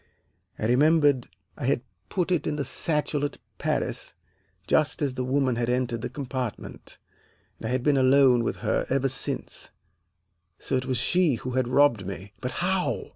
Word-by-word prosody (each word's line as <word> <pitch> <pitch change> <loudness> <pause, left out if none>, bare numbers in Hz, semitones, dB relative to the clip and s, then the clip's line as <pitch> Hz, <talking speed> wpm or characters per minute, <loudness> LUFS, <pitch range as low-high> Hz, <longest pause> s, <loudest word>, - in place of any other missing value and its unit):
I - - -3
remembered 145 +1 +4 0.3
I - - -5
had - - +1 0.3
put 180 -1 -1
it 170 -5 +1
in - - -1
the 145 -2 -2
satchel 150 +2 -1
at 145 - -2 0.2
Paris - - -2 0.5
just 155 -2 +2
as 140 -3 0
that 130 0 -3
woman 130 -2 +1
had 120 0 0
entered 125 -2 0
the - - -3
compartment, 130 -5 -6 0.6
and 110 - -4
I - - -2
had 130 -1 0
been 145 -1 +3
alone 130 -2 +5
with - - -1
her - - +1
ever 135 0 +1
since, 130 - -4 0.9
so 135 - -2
it 130 0 -1
was 130 -2 0
she 170 +4 +2
who 125 +2 -5
had 130 -1 0
robbed 125 -7 +3
me. 100 +1 -7
But 125 - -2 0.2
how? 185 -1 -1
130 Hz, 175 wpm, -26 LUFS, 125-145 Hz, 0.9 s, alone